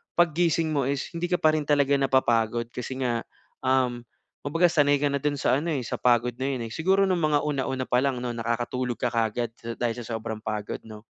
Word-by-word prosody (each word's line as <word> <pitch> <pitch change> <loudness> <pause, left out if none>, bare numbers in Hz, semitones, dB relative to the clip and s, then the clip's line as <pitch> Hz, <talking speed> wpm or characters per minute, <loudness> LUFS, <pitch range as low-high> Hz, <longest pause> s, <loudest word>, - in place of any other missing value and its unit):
paggising 170 -1 +2
mo 140 -4 +1
is 140 -1 -2
hindi 170 +1 -2
ka 180 - +3
pa 155 0 +5
rin 155 - -1
talaga 140 -1 +3
napapagod, 120 -4 +2
kasi 130 +2 -5
nga, 120 -2 0 0.4
um, 130 -2 +1 0.4
kumbaga 165 +5 +3
sanay 145 -2 +4
ka 145 - +3
na - - 0
doon 150 -1 0
sa - - +3
ano, 165 +2 -2
eh, 140 - 0
sa - - -3
pagod 120 -1 +3
na 130 - -5
iyon, 120 -2 -4
eh, - - -14
siguro 190 +4 +2
noong 180 -2 +1
mga 150 -1 +3
una-una 135 -3 -1
pa 125 - +3
lang 135 -3 0
'no 120 - -2
nakakatulog 120 +2 -2
ka - - +1
kaagad 115 0 0 0.3
dahil 120 -2 0
sa 120 - -7
sobrang 110 0 -5
pagod 105 -1 -3
'no? 110 -1 -11
130 Hz, 215 wpm, -26 LUFS, 120-150 Hz, 0.4 s, pa